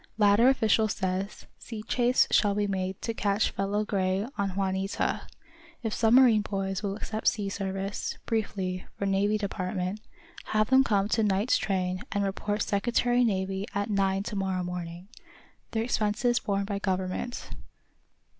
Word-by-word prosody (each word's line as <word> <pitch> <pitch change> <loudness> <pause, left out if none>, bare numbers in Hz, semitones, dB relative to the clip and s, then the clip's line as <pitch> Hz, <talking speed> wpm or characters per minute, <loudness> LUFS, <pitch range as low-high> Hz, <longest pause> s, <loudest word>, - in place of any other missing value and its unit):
Latter 210 +3 +5
official 220 -4 +3
says 190 0 -3
sea 220 -3 -7
chase 245 +2 +3
shall 205 -2 +4
be 205 0 +1
made 190 -1 -2
to 230 - -1
catch 205 -1 +1
fellow 205 +2 -1
Gray 190 0 0
on 195 -2 -2
'Juanita.' 195 0 -1 0.6
If 220 -2 -1
submarine 230 -1 +5
boys 195 -2 -3
will 200 -1 -2
accept 215 +1 -4
sea 205 -3 +1
service, 195 0 -3
briefly, 190 -5 -2
for 200 - -2
Navy 200 +2 +2
Department, 190 -1 -3 0.5
have 215 +2 +1
them 265 0 +7
come 200 -5 +1
to 225 - +2
night's 205 +2 +2
train 185 -1 -1
and 200 -1 0
report 205 +2 -1
Secretary 240 +4 +2
Navy 195 -2 -1
at 205 +2 -1
nine 195 -1 +1
to 205 - -5
morrow 190 -2 -1
morning. 175 0 -6 0.6
Their 225 0 -1
expenses 230 +1 +1
borne 200 -1 -1
by 200 0 -3
government." 190 +5 -3
200 Hz, 145 wpm, -28 LUFS, 190-215 Hz, 0.6 s, them